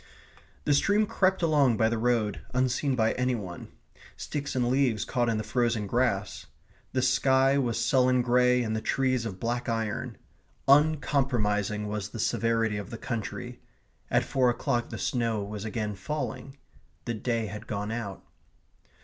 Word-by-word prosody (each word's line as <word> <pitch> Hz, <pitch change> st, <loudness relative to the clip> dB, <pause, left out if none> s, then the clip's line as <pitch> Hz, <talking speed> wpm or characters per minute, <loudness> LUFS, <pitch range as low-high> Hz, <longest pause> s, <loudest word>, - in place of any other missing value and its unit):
The 145 Hz, -, +3 dB
stream 205 Hz, +9 st, +3 dB
crept 190 Hz, -2 st, +1 dB
along 145 Hz, -8 st, +3 dB
by 110 Hz, -, +3 dB
the 115 Hz, 0 st, -1 dB
road 115 Hz, -3 st, 0 dB
unseen 130 Hz, +2 st, +1 dB
by 110 Hz, -2 st, +2 dB
any 125 Hz, 0 st, 0 dB
one. 95 Hz, -6 st, -7 dB, 0.5 s
Sticks 140 Hz, -2 st, -4 dB
and 125 Hz, -2 st, +1 dB
leaves 125 Hz, -4 st, +1 dB
caught 120 Hz, -1 st, 0 dB
in 110 Hz, -, 0 dB
the 110 Hz, -, -2 dB
frozen 120 Hz, -3 st, 0 dB
grass. 100 Hz, -7 st, -1 dB, 0.4 s
The 130 Hz, -1 st, 0 dB
sky 130 Hz, +1 st, +3 dB
was 120 Hz, -4 st, 0 dB
sullen 130 Hz, -1 st, +3 dB
grey 125 Hz, 0 st, +3 dB
and 110 Hz, -1 st, -2 dB
the 110 Hz, -, -2 dB
trees 130 Hz, -3 st, 0 dB
of 95 Hz, -3 st, -7 dB
black 120 Hz, +3 st, -2 dB
iron. 115 Hz, -2 st, -2 dB, 0.5 s
Uncompromising 130 Hz, -8 st, +2 dB
was 105 Hz, -1 st, -4 dB
the 115 Hz, -, -8 dB
severity 115 Hz, -1 st, +1 dB
of 105 Hz, -, -6 dB
the 115 Hz, -, -6 dB
country. 115 Hz, -2 st, -5 dB, 0.5 s
At -, -, +2 dB
four 130 Hz, -2 st, +2 dB
o'clock 120 Hz, 0 st, -1 dB
the 110 Hz, -, -6 dB
snow 115 Hz, +1 st, -1 dB
was 105 Hz, +1 st, -6 dB
again 110 Hz, -1 st, -3 dB
falling. 135 Hz, +4 st, -5 dB, 0.5 s
The 120 Hz, -, -2 dB
day 115 Hz, 0 st, -1 dB
had 105 Hz, +2 st, -7 dB
gone 105 Hz, +1 st, -3 dB
out. 115 Hz, -4 st, -5 dB
120 Hz, 160 wpm, -28 LUFS, 110-130 Hz, 0.5 s, The